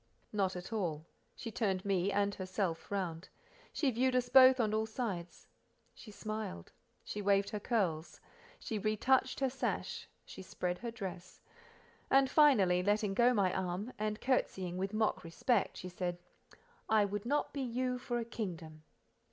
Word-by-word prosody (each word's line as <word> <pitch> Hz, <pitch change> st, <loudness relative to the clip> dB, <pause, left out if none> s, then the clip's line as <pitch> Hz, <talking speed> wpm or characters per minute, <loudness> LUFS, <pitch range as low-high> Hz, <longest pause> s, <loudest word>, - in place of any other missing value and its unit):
Not 195 Hz, -3 st, 0 dB
at 180 Hz, +5 st, -7 dB
all. 165 Hz, -8 st, -2 dB, 0.3 s
She 230 Hz, -, -6 dB
turned 195 Hz, -4 st, -1 dB
me 195 Hz, -1 st, +1 dB
and 200 Hz, 0 st, +1 dB
herself 185 Hz, -3 st, -3 dB
round; 185 Hz, -4 st, -3 dB, 0.4 s
she 280 Hz, -4 st, +1 dB
viewed 255 Hz, +2 st, +1 dB
us 245 Hz, -1 st, +1 dB
both 260 Hz, 0 st, +8 dB
on 215 Hz, -3 st, +1 dB
all 220 Hz, 0 st, +1 dB
sides; 205 Hz, -7 st, -4 dB, 0.5 s
she 225 Hz, -, -13 dB
smiled, 215 Hz, -, -6 dB, 0.3 s
she 210 Hz, -, -5 dB
waved 200 Hz, 0 st, +2 dB
her 210 Hz, -, -3 dB
curls, 185 Hz, -8 st, -1 dB, 0.4 s
she 220 Hz, -, -4 dB
retouched 255 Hz, +6 st, +2 dB
her 270 Hz, -, +3 dB
sash, 270 Hz, -, -3 dB, 0.2 s
she -, -, -10 dB
spread 180 Hz, -1 st, -3 dB
her 235 Hz, -, -4 dB
dress, 190 Hz, -5 st, -7 dB, 0.7 s
and 270 Hz, 0 st, +4 dB
finally, 205 Hz, -, +5 dB
letting 205 Hz, +1 st, +1 dB
go 240 Hz, +4 st, +5 dB
my 200 Hz, -6 st, +2 dB
arm, 190 Hz, +6 st, -3 dB
and 215 Hz, 0 st, -2 dB
curtseying 190 Hz, -8 st, 0 dB
with 190 Hz, +1 st, -2 dB
mock 215 Hz, 0 st, 0 dB
respect, 195 Hz, +7 st, 0 dB
she 185 Hz, -, -6 dB
said: 180 Hz, -1 st, -3 dB, 0.7 s
"I 215 Hz, -2 st, +5 dB
would 205 Hz, +2 st, -4 dB
not 290 Hz, +3 st, 0 dB
be 280 Hz, -, -3 dB
you 250 Hz, 0 st, -1 dB
for 245 Hz, -1 st, -2 dB
a 235 Hz, -, -2 dB
kingdom." 170 Hz, -9 st, -6 dB
205 Hz, 160 wpm, -34 LUFS, 185-240 Hz, 0.7 s, both